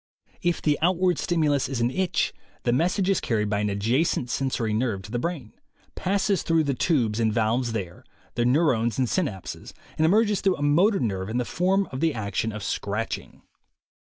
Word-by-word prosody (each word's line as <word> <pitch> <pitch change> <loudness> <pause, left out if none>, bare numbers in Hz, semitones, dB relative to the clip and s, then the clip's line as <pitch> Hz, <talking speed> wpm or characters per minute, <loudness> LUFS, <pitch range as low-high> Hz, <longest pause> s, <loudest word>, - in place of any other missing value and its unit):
If 175 -1 0
the 150 -2 +2
outward 180 0 +2
stimulus 150 -7 +1
is 135 -3 -2
an 120 +1 +1
itch, 185 +3 0 0.3
the 120 - +2
message 180 +7 +1
is 195 - +3
carried 105 -3 -1
by 105 - +1
an 105 0 0
adjacent 120 +5 0
sensory 125 -5 -1
nerve 110 -4 -1
to 100 - -10
the 120 - -1
brain, 145 -6 -4 0.4
passes 195 +1 0
through 165 -1 +2
the 140 -2 0
tubes 120 -6 +1
and 110 -1 +2
valves 115 +2 +1
there, 90 -6 -5 0.3
the 120 - 0
neu 125 +6 +3
rones 120 -6 +1
and 130 -2 +1
synapses, 115 - -3 0.3
and 160 - +4
emerges 210 +2 +3
through 190 -2 +2
a 145 - -4
motor 180 +9 +3
nerve 95 -4 -2
in 115 - -2
the 125 - 0
form 190 +6 +1
of 130 - -5
the 160 -2 +1
action 110 0 -2
of 105 -1 -7
scratching. 105 +3 -4
130 Hz, 190 wpm, -25 LUFS, 110-170 Hz, 0.4 s, and